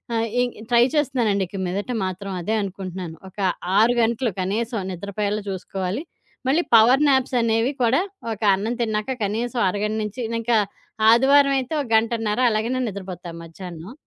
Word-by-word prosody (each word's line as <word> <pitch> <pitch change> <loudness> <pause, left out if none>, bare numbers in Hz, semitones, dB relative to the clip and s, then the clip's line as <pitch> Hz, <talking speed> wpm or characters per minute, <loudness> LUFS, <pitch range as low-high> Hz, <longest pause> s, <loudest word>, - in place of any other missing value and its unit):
ఆహ్, 225 0 0
ఈ 245 - +4 0.3
ట్రై 240 0 +5
చేస్తున్నానండి. 245 -9 +1
ఇక 195 - -8
మీదట 200 +7 -3
మాత్రం 185 +1 -5
అదే 210 +6 -2
అనుకుంటున్నాను. 185 -3 -6
ఒక 190 - -16 0.4
6 230 +3 +5
గంటలు 235 +2 +1
కనీసం 220 +5 -1
నిద్రపోయేలా 200 +3 -3
చూసుకోవాలి. 190 +3 -3 0.5
మళ్లీ 315 +6 +3
పవర్ 245 +6 +6
నాప్స్ 265 -1 +2
అనేవి 230 +3 +1
కూడా 245 +8 +3 0.3
ఒక 205 - -11
అన్నం 220 +5 -2
తిన్నాక 220 +3 -1
కనీసం 235 +4 -2
అరగంట 210 +3 -2
నుంచి, 210 +4 -5 0.2
ఇంకా 230 0 +2 0.5
ఆదివారం 275 +3 +5
అయితే 260 +4 -5
ఒక 265 - -6
గంటన్నర 225 -1 +1
అలాగేనే 225 +4 0
నిద్రపోతాం 185 -3 -7
మధ్యాహ్నం. 170 +4 -9
220 Hz, 145 wpm, -23 LUFS, 195-240 Hz, 0.5 s, పవర్